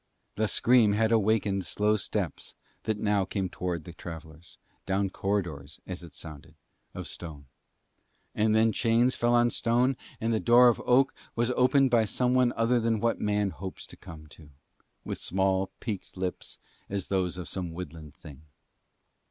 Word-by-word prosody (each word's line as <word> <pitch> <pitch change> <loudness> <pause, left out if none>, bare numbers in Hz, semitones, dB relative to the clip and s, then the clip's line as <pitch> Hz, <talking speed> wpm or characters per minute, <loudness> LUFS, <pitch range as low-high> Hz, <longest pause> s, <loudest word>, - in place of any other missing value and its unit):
The 110 0 0
scream 115 -2 +4
had 110 +2 +2
awakened 105 -3 +2
slow 105 +6 +1
steps 105 - -3 0.3
that 110 -1 0
now 105 -2 +1
came 95 -1 -2
towards 85 -2 -3
the 85 - -10
travellers, 80 -1 -10 0.3
down 95 0 0
corridors, 85 -9 -3
as 90 -1 -6
it 85 -5 -12
sounded, 75 +1 -10 0.4
of - - -5
stone. 75 -5 -7 0.9
And 110 0 +2
then 110 0 +4
chains 120 +3 +2
fell 120 0 +2
on 120 0 +4
stone 125 +3 +2 0.2
and 115 +1 0
the 110 - +1
door 120 +2 +6
of 120 - 0
oak 130 +2 +4 0.2
was 120 +1 +1
opened 130 +1 +3
by 115 -2 +4
some 125 +4 0
one 125 -1 +4
older 120 +2 +3
than 115 -1 +1
what 115 +2 0
man 105 -1 +1
hopes 95 0 -7
to - - -12
come 75 -2 -11
to, 80 -1 -15 0.6
with - - -4
small, 95 0 0
peaked 105 -5 -6
lips 90 -1 -4 0.3
as 100 -1 -3
those 90 -2 0
of 90 -3 -6
some 90 -3 -4
woodland 80 -3 -8
thing. 75 -1 -13
100 Hz, 165 wpm, -28 LUFS, 90-115 Hz, 0.9 s, door